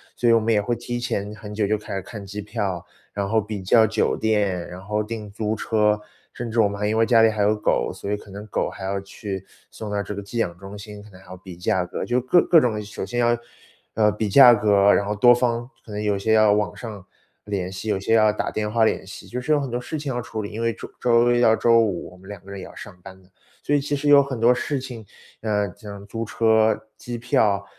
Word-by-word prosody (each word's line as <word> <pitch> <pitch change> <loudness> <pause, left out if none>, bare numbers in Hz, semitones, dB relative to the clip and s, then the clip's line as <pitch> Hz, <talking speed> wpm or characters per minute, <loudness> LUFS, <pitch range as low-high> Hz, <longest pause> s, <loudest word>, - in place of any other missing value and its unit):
所 120 - +1
以 - - +6
我 115 - +5
们 110 +1 +1
也 105 - +3
会 120 +4 -1
提 120 +1 -5
前 105 -3 -3
很 105 -1 -10
久 105 0 0
就 110 +1 +1
开 105 - -8
始 95 - -2
看 100 +1 -9
机 105 +2 -6
票， 95 -3 -3 0.3
然 100 -1 -3
后 110 +1 +2
比 105 -1 -6
较 110 +4 +5
酒 110 +1 0
店， 100 -5 0
然 90 - -9
后 105 +2 -2
订 110 -1 -6
租 105 +1 -2
车， 105 -1 +1 0.3
甚 120 -1 -5
至 115 +1 +2
我 105 - +3
们 100 - -6
还 105 - 0
因 110 - 0
为 115 - +4
家 115 -2 +5
里 115 - +6
还 110 -1 -2
有 105 +1 +3
狗， 105 - 0
所 100 - -7
以 105 - +1
可 105 -1 -12
能 105 +2 -9
狗 - - -1
还 95 - -8
要 100 0 -2
去 95 -1 -7 0.2
送 105 -2 -8
到 100 - -1
这 100 +1 -6
个 100 - -5
寄 110 +4 -7
养 85 -6 -1
中 100 +2 -10
心， 105 0 -10
可 105 - -15
能 90 -1 -16
还 95 - -19
要 95 - -9
比 90 -1 -12
价 90 +1 0
格， 90 - -5
就 125 +1 +1
各 130 +8 +4
各 165 -3 +6
种 120 -5 +1
的。 105 - -3
首 105 -2 -6
先 120 +5 -3
要 120 0 +3 0.6
呃， 105 -1 +3
比 105 0 -2
价 125 +3 +9
格， 100 -2 +4
然 100 - +1
后 105 - -1
多 120 +4 +6
方 120 0 -1 0.2
可 110 - -11
能 105 - -4
有 105 -1 0
些 110 +3 -1
要 110 -1 +5
网 105 0 0
上 105 -6 -9 0.4
联 95 -3 -3
系， 95 +3 -6
有 95 - 0
些 100 +4 0
要 110 -1 +5
打 - - -3
电 105 -1 -3
话 115 0 +3
联 105 - 0
系， 95 - -11
就 125 +1 -5
是 150 - -2
有 150 - +4
很 135 -2 -4
多 120 +1 -3
事 155 +5 -5
情 140 -3 -4
要 120 - -2
处 110 -2 -5
理， 100 - -6
因 110 +2 -5
为 115 0 +1
周 115 - -9
周 120 0 +4
一 120 - +2
到 110 -2 +5
周 115 0 +4
五， 100 -6 -2
我 90 - -16
们 95 +2 -15
2 100 -3 -8
个 - - -13
人 100 -1 -7
也 - - -8
要 - - -12
上 100 -4 -11
班 95 0 -12
的。 90 - -25 0.3
所 145 - +1
以 145 - +2
其 145 +1 -4
实 145 +1 -3
有 145 -1 +7
很 130 -3 -5
多 120 +2 +5
事 140 +2 -2
情， 120 -4 -8 0.4
呃， 105 -3 0
像 100 -1 -10
租 115 +2 -4
车、 110 -1 +2
机 120 0 -6
票、 105 -4 +1
105 Hz, 295 characters per minute, -23 LUFS, 100-115 Hz, 0.6 s, 价